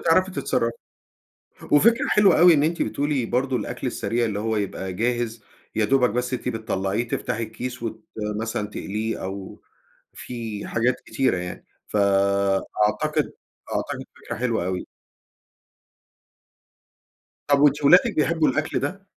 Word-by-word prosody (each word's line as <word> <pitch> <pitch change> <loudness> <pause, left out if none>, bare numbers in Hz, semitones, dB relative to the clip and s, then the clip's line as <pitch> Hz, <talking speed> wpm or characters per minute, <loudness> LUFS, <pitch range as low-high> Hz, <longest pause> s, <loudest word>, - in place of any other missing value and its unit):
بتعرفي 185 +3 +3
تتصرّفي. 115 -9 0 1.0
وفكرة 230 - +5
حلوة 205 -3 +5
أوي 175 -1 +8
إن 145 - +3
أنتِ 165 +2 +1
بتقولي 140 -4 -1
برضه 130 +2 0
الأكل 105 - -4
السريع 120 +1 -1
اللي 105 -2 -2
هو 110 +1 -1
يبقى 95 -2 -3
جاهز 115 +1 -1 0.3
يدوبك 125 +2 +3
بس 125 +2 -2
أنتِ - - -3
بتطلّعيه 110 +1 -2
تفتحي 115 - -2
الكيس 120 +3 -6
وت 110 -1 -5 0.4
مثلًا 110 -2 -2
تقليه 110 +2 -4
أو 95 0 -7 0.5
في 115 -4 -6
حاجات 120 +2 +1
كتيرة 130 -8 +1
يعني. 90 0 -6 0.2
فأعتقد، 100 +1 +1 0.4
أعتقد - - -3
فكرة - - -7
حلوة 115 -7 0
أوي. 90 0 -3 2.6
طب 140 -1 +4
وأنتِ 145 0 +4
ولادِك 180 +9 +6
بيحبوا 160 +1 +2
الأكل 145 +2 0
ده؟ 195 +1 -4
115 Hz, 125 wpm, -24 LUFS, 105-140 Hz, 2.6 s, أوي